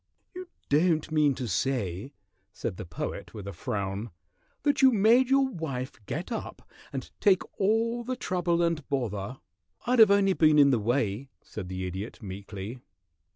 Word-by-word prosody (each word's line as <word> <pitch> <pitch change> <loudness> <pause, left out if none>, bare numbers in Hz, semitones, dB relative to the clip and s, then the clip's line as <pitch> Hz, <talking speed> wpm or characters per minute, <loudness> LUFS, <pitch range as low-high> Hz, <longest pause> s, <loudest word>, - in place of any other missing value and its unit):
"You 365 0 -8 0.2
don't 160 +1 +2
mean 150 -3 +3
to 125 -2 -4
say," 115 -2 -2 0.4
said - - -5
the - - -7
Poet, - - -6
with 105 -3 -7
a 100 - -5
frown, 100 -1 -3 0.5
"that 290 0 +2
you 265 -1 +7
made 235 +4 +4
your 270 0 +4
wife 135 - -5
get - - -4
up - - -6 0.2
and 135 -3 -5
take 190 -3 +4 0.2
all 230 +4 +1
the 255 +2 -3
trouble 175 -6 0
and 165 -2 0
bother 120 -4 -2 0.2
" - - -33
"I'd 245 -1 +4
only 200 -1 +4
have - - -3
been 155 -1 +6
in 140 -1 +7
the 125 - +2
way," 115 +2 -1
said 90 - -7
the 95 0 -4
Idiot, 95 +5 -6
meekly. 100 +3 -7
140 Hz, 165 wpm, -28 LUFS, -, 0.5 s, you